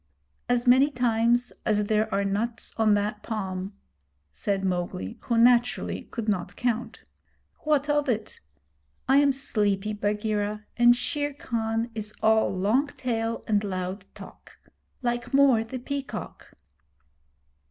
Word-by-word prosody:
'As 245 -1 +2
many 260 +3 +6
times 240 -1 +1
as 210 -1 +1
there 215 +1 +1
are 200 0 +1
nuts 220 +3 -2
on 215 -2 +4
that 210 +1 -2
palm,' 190 -4 -4 0.6
said 195 - -2
Mowgli, 175 - -3
who, 235 - -1
naturally, 240 +1 +3
could 230 -3 -5
not 180 -4 -1
count. 245 -1 -2 0.6
'What 300 -2 +1
of 295 -1 +1
it? 220 -3 -2 0.7
I 270 +2 +5
am 285 0 +5
sleepy, 210 -6 0
Bagheera, 210 0 -2
and 240 0 +6
Shere 290 +2 -2
Khan 225 -2 -2
is 215 -1 -5
all 220 0 +4
long 210 +10 +1
tail 230 -4 -3
and 210 -2 +1
loud 185 0 -4
talk - - -13 0.5
like 240 +2 -1
Mor 270 -5 +5
the 225 +3 -6
Peacock.' 275 +2 -6
225 Hz, 130 wpm, -26 LUFS, 205-245 Hz, 0.7 s, many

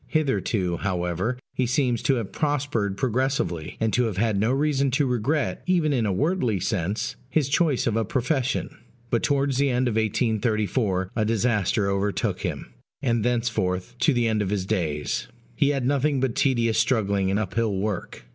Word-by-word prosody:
Hitherto, 115 - 0
however, 90 +5 -1 0.2
he 130 - 0
seems 125 -2 +1
to 135 - +2
have 115 -5 -3
prospered 140 -9 -1
progressively, 125 - -1
and 110 -1 0
to 125 - +3
have 105 -5 -3
had 110 0 +1
no 110 +4 +2
reason 140 0 +1
to 140 +3 +1
regret, 130 +4 0
even 170 -5 +2
in 120 -5 +1
a - - +1
wordly 130 - +1
sense, 100 +1 -2
his 145 0 +1
choice 145 -1 +2
of 115 - +1
a 115 - +2
profession. 130 +4 -1 0.4
But 115 - +2
towards 140 -2 +1
the 140 0 +3
end 125 0 +1
of 110 -2 0
1834 110 -3 0
a 110 - +1
disaster 110 -2 +1
overtook 100 +1 -1
him; - - -4 0.3
and 115 -4 +1
thenceforth, 115 -4 -1
to 155 - +4
the 120 -3 +1
end 110 -1 +1
of 100 - -1
his 100 -2 -1
days, 80 -8 -1 0.3
he 140 - +3
had 135 -3 0
nothing 140 +1 +1
but 130 -2 0
tedious 115 -5 +2
struggling 100 -5 +1
and 100 - +1
uphill 110 +1 -1
work. 100 -9 -3
115 Hz, 175 wpm, -25 LUFS, 100-135 Hz, 0.4 s, to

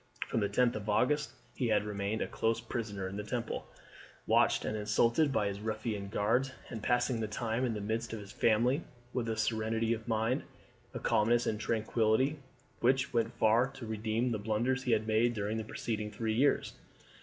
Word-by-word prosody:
From - - 0
the 100 -2 +1
10th 120 +4 +3
of 105 0 -5
August 145 +8 +2 0.2
he 125 - -1
had 105 -2 +3
remained 105 +1 -2
a - - -4
close 115 0 0
prisoner 110 -5 -4
in 95 +2 -6
the 105 - -3
Temple, 115 +2 -3 0.6
watched - - +3
and 110 - -1
insulted 115 +7 +2
by 105 - +1
his 100 0 -2
ruffian 110 -1 -3
guards, 115 +7 +1 0.2
and 115 - -5
passing 120 +1 +1
the 110 - -1
time 115 +3 -2
in 120 -3 0
the 105 - -4
midst 110 +3 -2
of 115 - -4
his 100 -1 -10
family 120 +6 +2 0.3
with 120 -2 -1
a 110 - -1
serenity 110 +1 +1
of 110 0 -6
mind, 115 +2 +1 0.5
a - - -2
calmness, 115 +1 +2
and 105 - -1
tranquility 115 +5 +1 0.4
which 130 +2 +2
went 115 0 0
far 115 +3 +4
to 135 -3 -9
redeem 110 +2 -1
the 110 - -1
blunders 115 +5 0
he 130 -2 -1
had 110 -1 +1
made 115 +2 +2
during 105 +1 -1
the 110 - -2
preceding 110 -1 -3
three 110 0 -2
years. 135 +6 +2
110 Hz, 190 wpm, -32 LUFS, 105-120 Hz, 0.6 s, far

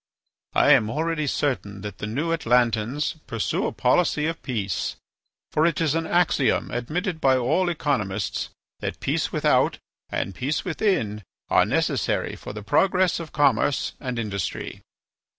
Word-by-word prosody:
I - - +5
am 120 -7 +5
already 155 +3 -1
certain 105 -9 -1
that 105 -1 -7
the 105 - -3
New 140 +10 -2
Atlantans 125 +2 +1
pursue 115 -2 -1
a - - -2
policy 150 -4 +2
of 165 +1 -2
peace. 105 - -2 0.6
For 155 - +2
it 165 - 0
is 160 -3 +2
an 165 0 -1
axiom 170 -6 +2
admitted 160 - -2
by 130 -1 +4
all 175 +9 +1
economists 110 - -1 0.3
that - - -4
peace - - -1
without - - +2 0.3
and 95 - -2
peace 140 - -2
within 165 - 0 0.3
are - - +5
necessary - - 0
for - - -8
the 105 0 -7
progress 185 - +2
of 165 -2 -7
commerce 145 -1 +2
and 125 -3 -4
industry." 100 -6 -4
140 Hz, 145 wpm, -24 LUFS, 110-165 Hz, 0.6 s, I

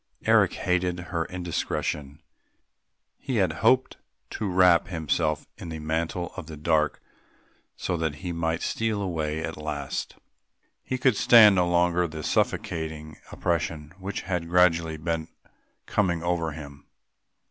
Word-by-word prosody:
Eric - - +4
hated 90 0 0
her 85 -1 0
indiscretion; 80 -5 -3 1.0
he - - -3
had - - +2
hoped 130 0 +3 0.3
to 105 -3 -3
wrap 90 -2 +5
himself 80 -2 -1
in 85 - -7
the 80 - -5
mantle 80 +3 -2
of 90 -5 -7
the 80 -2 -8
dark 75 0 +1 0.8
so 90 - -2
that 80 -2 -1
he 90 +2 -5
might 80 0 -1
steal 110 -2 -1
away 80 -5 -2
at 80 - -5
last. 75 -3 -4 0.7
He 130 - -3
could 130 -2 +3
stand 110 -1 +8
no 90 -2 +2
longer 90 0 +2
the 80 -1 -7
suffocating 80 -1 -2
oppression 85 -3 -2
which 95 +2 -4
had 90 -3 -3
gradually 85 -3 +3
been 80 0 -2 0.6
coming 85 -5 0
over 85 -2 -1
him. 70 -2 -10
85 Hz, 135 wpm, -26 LUFS, 80-90 Hz, 1.0 s, stand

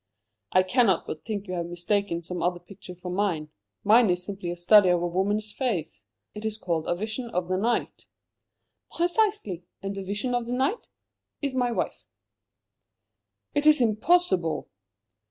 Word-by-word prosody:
"I 185 - +5
cannot 200 -2 +3
but 155 - -6
think 210 -3 -3
you 185 - -4
have 170 -1 -2
mistaken 175 0 -1
some 180 +1 -3
other 175 0 0
picture 180 0 -12
for 180 0 -7
mine. 175 -6 -1 0.3
Mine 220 +1 +6
is 180 0 +2
a - - -3
simple 185 -3 -5
study 185 +2 +6
of 175 -1 +2
a - - +1
woman's 205 +4 -1
face. 205 - -3 0.3
It 210 - -8
is 220 -1 -2
called 170 -6 -2
'A 175 - +1
Vision 220 +5 -4
of 180 -5 -2
the 185 - +1
Night.'" 230 +5 -1 0.8
"Precisely. 350 - 0 0.2
And 195 0 -3
'A 195 - -4
Vision 205 +6 -3
of 245 -1 -1
the 245 - -2
Night' 270 - -1 0.5
is 280 -2 -1
my 250 -2 +1
wife." - - -3 1.5
"It 290 +1 +2
is 305 -2 +7
impossible!" 220 - +2
200 Hz, 165 wpm, -26 LUFS, 175-235 Hz, 1.5 s, is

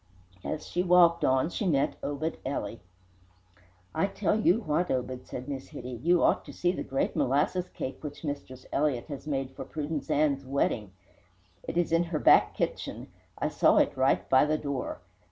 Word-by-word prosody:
As 155 - -4
she 175 - -1
walked 175 -2 +5
on 130 +4 +3
she 205 - -2
met 140 -5 +2
Obed 145 +3 -3
Ely. 115 -5 -3 1.2
"I 160 +5 +1
tell 200 0 0
you 215 +1 +3
what, 175 -1 0
Obed," 130 0 -3
said 125 - -6
Miss 135 -2 -5
Hitty, 125 -1 -7
"you 175 +3 +3
ought - - +3
to - - -9
see 175 - +1
the - - -4
great 135 - -1
molasses 150 +7 +1
cake 130 - -6
which 145 +1 -7
Mistress 140 -4 -6
Elliott 140 -4 +1
has 145 +1 -7
made 135 -3 -2
for 130 - -7
Prudence 150 -1 -4
Ann's 140 -2 +2
wedding. 130 -7 -1 0.7
It 170 - -5
is 175 -1 +1
in 165 +1 +3
her 165 -2 -2
back - - +5
kitchen. - - -3 0.3
I - - -1
saw - - +4
it - - +3
right 130 0 +2
by 130 - +5
the 155 +1 +1
door. 140 -4 -4
145 Hz, 180 wpm, -29 LUFS, 130-170 Hz, 1.2 s, walked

